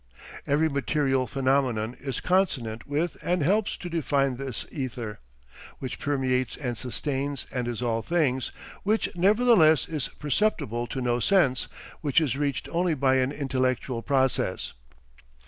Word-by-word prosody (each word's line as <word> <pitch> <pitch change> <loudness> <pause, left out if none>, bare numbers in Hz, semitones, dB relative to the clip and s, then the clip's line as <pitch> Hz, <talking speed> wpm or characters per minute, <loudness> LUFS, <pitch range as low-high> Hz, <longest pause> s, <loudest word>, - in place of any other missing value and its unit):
Every 150 +3 +3
material 140 -3 +1
phenomenon 130 -4 +1
is 135 -2 -4
consonant 135 - 0
with 155 +4 -1
and 180 -3 0
helps 205 +6 +1
to 180 - -7
define 140 -6 0
this 135 -2 -4
ether, 125 -6 -5 0.6
which 130 -2 -6
permeates 130 -3 0
and 125 -4 -3
sustains 135 +3 -2
and 125 -2 -2
is 120 0 -3
all 115 -1 0
things, 130 -1 0 0.3
which 215 -1 0
nevertheless 190 - +5
is 155 -5 -2
perceptible 145 - -1
to 130 - -4
no 120 -1 +1
sense, 140 -5 +3 0.3
which 145 +1 +3
is 145 -6 0
reached 140 -2 -1
only 170 -1 +1
by 130 -1 +3
an 130 +1 +1
intellectual 130 -3 -1
process. 135 0 0
135 Hz, 135 wpm, -27 LUFS, 125-155 Hz, 0.6 s, nevertheless